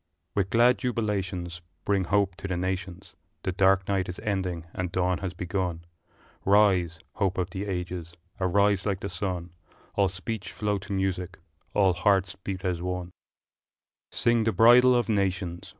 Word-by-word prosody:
With 95 -2 0
glad 120 +3 +4
jubilations 95 -8 -2 0.2
Bring 100 -2 +1
hope 100 0 +1
to 100 - -5
the 90 -2 -2
nations 95 0 -4 0.3
The 95 - 0
dark 95 0 +3
night 95 -2 0
is 90 - -6
ending 95 -6 -2
and 90 -1 -3
dawn 90 -1 +1
has 95 -3 -4
begun 90 -2 -3 0.6
Rise, 95 -4 +4 0.2
hope 95 -3 0
of 90 -1 -1
the 95 +2 -4
ages, 90 -2 -4 0.3
arise 100 +1 +2
like 100 -2 -1
the 100 - -3
sun, 90 -1 -4 0.4
All 100 -2 +2
speech 95 +1 -5
flow 105 -2 -1
to 95 +2 -10
music, 95 -1 -2 0.4
all 95 -3 +4
hearts 95 0 +2
beat 95 0 -6
as 90 -2 -1
one! 90 0 -3
II. - - -23 1.0
Sing 115 -1 +2
the 115 - +2
bridal 125 +3 +7
of 120 - +1
nations! 95 -5 -1
95 Hz, 160 wpm, -27 LUFS, 90-100 Hz, 1.0 s, bridal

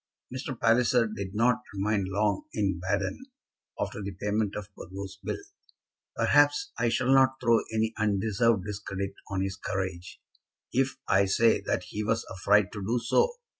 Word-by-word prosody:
Mr. 130 -1 -5
Palliser 120 +1 +4
did 100 -3 -6
not 120 +3 +3 0.2
remain 100 0 0
long 100 +1 0
in 95 -4 0
Baden 100 - -1 0.6
after - - -3
the 100 - -4
payment 105 0 0
of 105 0 -7
Burgo's 95 +1 -8
bill. - - -2 0.8
Perhaps 145 0 +3
I 120 0 +2
shall 125 +3 +2
not 130 0 +4
throw 115 -2 +4
any 110 0 0
undeserved 105 0 +2
discredit 100 -1 -4 0.2
on 95 -1 -1
his 95 0 -3
courage 95 -2 -4 0.5
if 130 +1 +1
I 100 +1 +4
say 110 +4 +3
that 90 - 0
he 105 +3 -3
was 115 +1 0
afraid 100 +1 +3
to 105 - -6
do 115 +6 0
so. 120 - +2
105 Hz, 155 wpm, -28 LUFS, 95-115 Hz, 0.8 s, Palliser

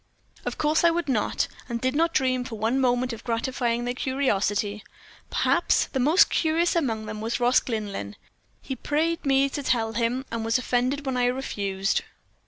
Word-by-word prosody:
Of - - -3
course 305 +2 +2
I 340 - +7
would 340 0 -1
not, 235 -6 0 0.2
and 235 -1 -2
did 255 +2 0
not 330 +2 +2
dream 255 -4 +1
for 240 -2 -7
one 225 +5 +1
moment 250 -1 +1
of 225 - -9
gratifying 240 0 -1
their 245 - -1
curiosity. 210 -6 0 0.5
Perhaps - - +2
the 265 - 0
most 330 +11 +5
curious 335 +2 +2
among 230 -10 0
them 215 0 -6
was 230 +3 -2
Ross 245 +1 +4
Glynlyn. 200 - -4 0.5
He 265 - -4
prayed 320 +5 -1
me 270 0 +4
to 285 - -4
tell 225 -4 0
him, 235 +4 -1
and 230 -1 -2
was 225 +1 +2
offended 255 +3 0
when 265 -2 -1
I 245 - +2
refused. 200 -6 -1
250 Hz, 180 wpm, -25 LUFS, 225-275 Hz, 0.5 s, I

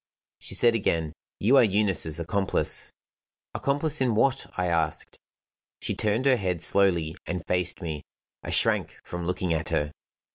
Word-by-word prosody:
She - - -4
said 120 -1 +4
again: 80 -8 0 0.2
"You 125 +7 +4
are - - +7
Eunice's 95 -6 +1
accomplice." 95 +4 0 0.6
"Accomplice 145 +1 0
in 125 -4 +2
what?" 135 +4 +2
I 90 - 0
asked. 80 -3 -1 0.6
She - - -3
turned 110 +5 0
her 130 -2 +5
head 90 -5 -1
slowly 85 -5 +2
and 90 -1 -4
faced 90 +1 -1
me. 80 -3 -4 0.4
I - - -7
shrank - - +1
from 90 -1 -6
looking 90 -1 -1
at 80 -1 -1
her. 75 0 0
90 Hz, 150 wpm, -26 LUFS, 85-115 Hz, 0.6 s, are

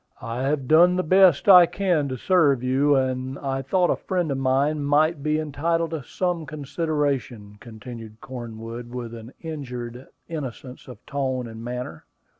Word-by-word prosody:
"I 115 +2 -5
have 135 -1 -1
done 175 +4 +6
the 185 - 0
best 185 -1 +4
I 180 -3 +9
can 175 -7 0
to 130 - -4
serve 145 -7 +3
you, 135 +3 +3
and 130 0 -1
I 135 -1 -3
thought 175 +7 +1
a - - +2
friend 180 -5 -2
of 135 - -2
mine 140 +3 +1
might 150 +2 +2
be 155 +1 0
entitled 160 +2 -1
to 160 -3 -3
some 175 +3 -3
consideration," 140 -8 -3
continued 115 -1 -10
Cornwood, 115 -1 -8
with 120 -1 -6
an 115 +1 -9
injured 125 -6 -7 0.2
innocence 135 -5 -7
of 125 - -12
tone 130 -3 -2
and 115 0 -9
manner. 120 -10 -6
135 Hz, 160 wpm, -24 LUFS, 125-155 Hz, 0.2 s, I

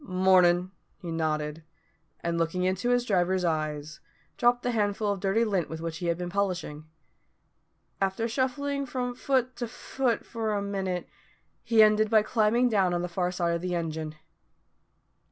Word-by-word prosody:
"Mornin'," 185 -3 +3 0.3
he 175 -4 -7
nodded, 155 -1 -2 0.6
and 170 0 -1
looking 165 +2 0
into 185 +6 0
his 245 0 +2
driver's 185 -3 +1
eyes, 155 -2 -2 0.4
dropped 245 0 +2
the 245 - 0
handful 205 -2 0
of 200 - -3
dirty 200 +4 +2
lint 195 -6 0
with 160 - -5
which 165 0 -4
he 175 - -3
had 170 -1 +1
been 180 0 -4
polishing. 180 -6 -2 1.2
After 195 +4 0
shuffling 280 +3 -1
from 250 -1 -3
foot 255 0 0
to 240 - -3
foot 245 +1 -2
for 220 -2 -2
a 200 - -1
minute, 190 -3 -3 0.5
he 225 -2 +5
ended 215 0 +4
by 215 -1 +5
climbing 225 +2 +2
down 195 -6 +2
on 175 - -1
the - - -1
far 180 +1 -1
side 175 -2 0
of 170 - -2
the 180 0 -2
engine. 160 -2 -3
190 Hz, 165 wpm, -28 LUFS, 170-230 Hz, 1.2 s, he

